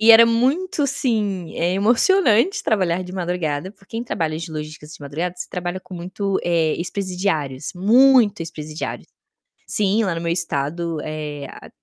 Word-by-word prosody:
E 225 Hz, +1 st, +7 dB
era 230 Hz, +1 st, +9 dB
muito, 275 Hz, +9 st, +1 dB
assim, 210 Hz, -10 st, -1 dB
emocionante 235 Hz, -, +3 dB
trabalhar 185 Hz, -4 st, +1 dB
de 180 Hz, -, -9 dB
madrugada, 175 Hz, -3 st, -2 dB
porque 200 Hz, +1 st, -24 dB
quem 235 Hz, -, -3 dB
trabalha 160 Hz, -8 st, -2 dB
de 170 Hz, 0 st, -6 dB
logística 155 Hz, -1 st, -7 dB
de 150 Hz, -, -11 dB
madrugada, 155 Hz, +5 st, -3 dB
você -, -, -6 dB
trabalha 180 Hz, +1 st, -3 dB
com 185 Hz, -, -11 dB
muito, 190 Hz, +3 st, -2 dB
eh, 165 Hz, -3 st, +2 dB
ex-presidiários, 180 Hz, -7 st, -2 dB
muito 230 Hz, +2 st, +5 dB
ex-presidiários 155 Hz, -1 st, -5 dB, 0.6 s
sim, 210 Hz, +2 st, +1 dB
lá 185 Hz, -4 st, 0 dB
no 165 Hz, -, -4 dB
meu 170 Hz, 0 st, 0 dB
estado, 165 Hz, 0 st, -2 dB
eh, 150 Hz, -2 st, -5 dB
a -, -, -12 dB
180 Hz, 150 wpm, -21 LUFS, 160-215 Hz, 0.6 s, era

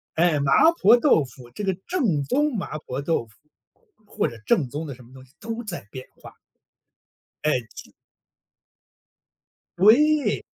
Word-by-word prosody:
哎， 165 Hz, -2 st, +2 dB
麻 140 Hz, -1 st, 0 dB, 0.3 s
婆 225 Hz, +5 st, +7 dB
豆 235 Hz, -, +3 dB
腐 125 Hz, -2 st, -13 dB
这 205 Hz, -, -7 dB
个 190 Hz, -1 st, 0 dB
正 225 Hz, -, 0 dB
宗 285 Hz, -, 0 dB
麻 155 Hz, -, -5 dB
婆 130 Hz, -2 st, -6 dB
豆 145 Hz, -4 st, -1 dB
腐， 110 Hz, -, -24 dB, 0.7 s
或 -, -, -2 dB
者 115 Hz, -, -9 dB
正 135 Hz, +4 st, +2 dB
宗 150 Hz, +5 st, -5 dB
的 145 Hz, -, -6 dB
什 125 Hz, -, -16 dB
么 120 Hz, +2 st, -19 dB
东 130 Hz, -1 st, -13 dB
西 130 Hz, -, -28 dB
都 230 Hz, +2 st, -6 dB
在 175 Hz, -, -7 dB
变 130 Hz, -1 st, -8 dB, 0.2 s
化。 -, -, -12 dB, 1.1 s
哎， 155 Hz, -, +2 dB, 0.2 s
就 -, -, -11 dB, 1.9 s
对。 290 Hz, -, +4 dB
160 Hz, 165 characters per minute, -23 LUFS, -, 1.9 s, 婆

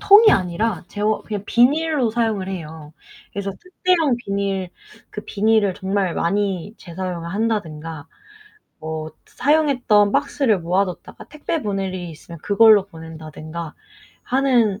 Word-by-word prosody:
통이 425 Hz, +2 st, +8 dB
아니라 185 Hz, +1 st, 0 dB
재활 210 Hz, +1 st, 0 dB
그냥 210 Hz, -2 st, -4 dB
비닐로 280 Hz, 0 st, +3 dB
사용을 220 Hz, -5 st, -1 dB
해요. 160 Hz, -4 st, -7 dB, 0.4 s
그래서 200 Hz, 0 st, -3 dB
특대형 360 Hz, -7 st, +1 dB
비닐, 200 Hz, -4 st, -2 dB, 0.4 s
그 210 Hz, -, -7 dB
비닐을 210 Hz, -2 st, +2 dB
정말 190 Hz, -2 st, -1 dB
많이 195 Hz, +2 st, -1 dB
재사용을 175 Hz, -1 st, -5 dB
한다든가 165 Hz, -8 st, -3 dB, 0.7 s
뭐 155 Hz, 0 st, -5 dB, 0.2 s
사용했던 255 Hz, -8 st, +3 dB
박스를 230 Hz, -8 st, +1 dB
모아 180 Hz, +4 st, +2 dB
뒀다가 180 Hz, -2 st, -9 dB
택배 305 Hz, +1 st, -4 dB
보낼 195 Hz, -3 st, -2 dB
일이 180 Hz, -2 st, -5 dB
있으면 165 Hz, +1 st, -11 dB
그걸로 210 Hz, -1 st, +6 dB
보낸다든가 160 Hz, -2 st, -8 dB, 0.5 s
하는 245 Hz, -6 st, +2 dB
200 Hz, 295 characters per minute, -21 LUFS, 170-230 Hz, 0.7 s, 통이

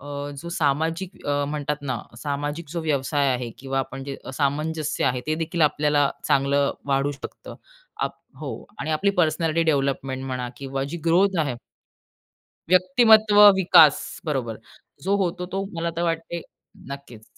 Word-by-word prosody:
अ, 145 Hz, -, -12 dB, 0.4 s
जो 170 Hz, -, -7 dB
सामाजिक 165 Hz, +4 st, -1 dB
अ, 145 Hz, 0 st, +1 dB
म्हणतात 150 Hz, 0 st, -2 dB
ना 135 Hz, -3 st, -2 dB, 0.2 s
सामाजिक 145 Hz, +4 st, -4 dB
जो 170 Hz, -, -2 dB
व्यवसाय 145 Hz, -2 st, +1 dB
आहे 125 Hz, -1 st, -3 dB
किंवा 135 Hz, 0 st, -3 dB
आपण 135 Hz, 0 st, -4 dB
जे 140 Hz, 0 st, -5 dB, 0.2 s
सामंजस्य 150 Hz, +2 st, -1 dB
आहे 125 Hz, 0 st, +1 dB
ते 155 Hz, -, +1 dB
देखील 165 Hz, +2 st, -3 dB
आपल्याला 145 Hz, -1 st, +3 dB
चांगलं 140 Hz, +1 st, +2 dB
वाढू 140 Hz, 0 st, +1 dB
शकतं 140 Hz, -, -9 dB, 0.5 s
आप -, -, -1 dB, 0.2 s
हो -, -, -5 dB, 0.3 s
आणि 160 Hz, -, -3 dB
आपली 175 Hz, +6 st, +2 dB
पर्सनॅलिटी 160 Hz, 0 st, +1 dB
डेव्हलपमेंट 135 Hz, -2 st, -1 dB
म्हणा 130 Hz, -2 st, -3 dB
किंवा 135 Hz, 0 st, -3 dB
जी 170 Hz, -, -5 dB
ग्रोथ 180 Hz, +3 st, +3 dB
आहे 140 Hz, -5 st, -1 dB, 1.2 s
व्यक्तिमत्व 210 Hz, +3 st, +5 dB, 0.2 s
विकास 170 Hz, -5 st, +7 dB, 0.3 s
बरोबर. 130 Hz, -8 st, -2 dB, 0.4 s
जो 195 Hz, +2 st, +2 dB
होतो 180 Hz, 0 st, -2 dB
तो 195 Hz, 0 st, -1 dB
मला 170 Hz, 0 st, -1 dB
तर 170 Hz, -, -1 dB
वाटते 165 Hz, +1 st, -3 dB, 0.5 s
नक्कीच. 125 Hz, -6 st, -10 dB
150 Hz, 145 wpm, -24 LUFS, 135-170 Hz, 1.2 s, विकास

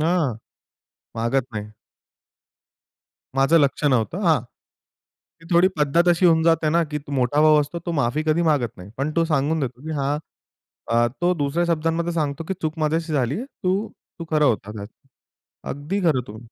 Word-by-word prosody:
हां, 160 Hz, -7 st, +1 dB, 0.8 s
मागत 115 Hz, +3 st, 0 dB
नाही. 105 Hz, 0 st, -5 dB, 1.7 s
माझं 135 Hz, +5 st, +4 dB
लक्ष 140 Hz, +1 st, 0 dB
नव्हतं. 130 Hz, -, +1 dB
हां, 160 Hz, -7 st, +3 dB, 1.0 s
ती 165 Hz, -, -16 dB
थोडी 175 Hz, +2 st, +6 dB
पद्धत 155 Hz, +4 st, +2 dB
अशी 175 Hz, +1 st, +4 dB
होऊन 160 Hz, -1 st, +4 dB
जाते 165 Hz, -1 st, +3 dB
ना, 170 Hz, +1 st, +3 dB
की 150 Hz, 0 st, -4 dB
तू 145 Hz, 0 st, -11 dB
मोठा 135 Hz, +2 st, +1 dB
भाऊ 155 Hz, -1 st, +6 dB
असतो 150 Hz, +4 st, -4 dB
तो 170 Hz, -, -1 dB
माफी 140 Hz, 0 st, 0 dB
कधी 160 Hz, +2 st, +2 dB
मागत 145 Hz, -9 st, +1 dB
नाही. 90 Hz, +3 st, -11 dB
पण 145 Hz, +3 st, -1 dB
तो 165 Hz, -, +3 dB
सांगून 155 Hz, 0 st, 0 dB
देतो 125 Hz, -2 st, -4 dB
की -, -, -4 dB
हां, 140 Hz, +2 st, 0 dB, 0.7 s
अ, 120 Hz, 0 st, +3 dB, 0.2 s
तो 175 Hz, +1 st, +4 dB
दुसऱ्या 150 Hz, +2 st, 0 dB
शब्दांमध्ये 165 Hz, +2 st, -1 dB
सांगतो 155 Hz, -1 st, -2 dB
की 190 Hz, -, -1 dB
चूक 160 Hz, +1 st, -2 dB
माझ्याशी 160 Hz, +1 st, 0 dB
झालीये. 140 Hz, -, 0 dB
तू, 200 Hz, -4 st, -2 dB, 0.3 s
तू 165 Hz, -, -5 dB
खरं 155 Hz, -1 st, +3 dB
होता. 105 Hz, -6 st, +1 dB
खरं, 100 Hz, -2 st, -7 dB, 0.9 s
अगदी 150 Hz, +9 st, -3 dB
खरं 155 Hz, -8 st, +2 dB
तू 105 Hz, -, -9 dB
155 Hz, 170 wpm, -22 LUFS, 135-165 Hz, 1.7 s, थोडी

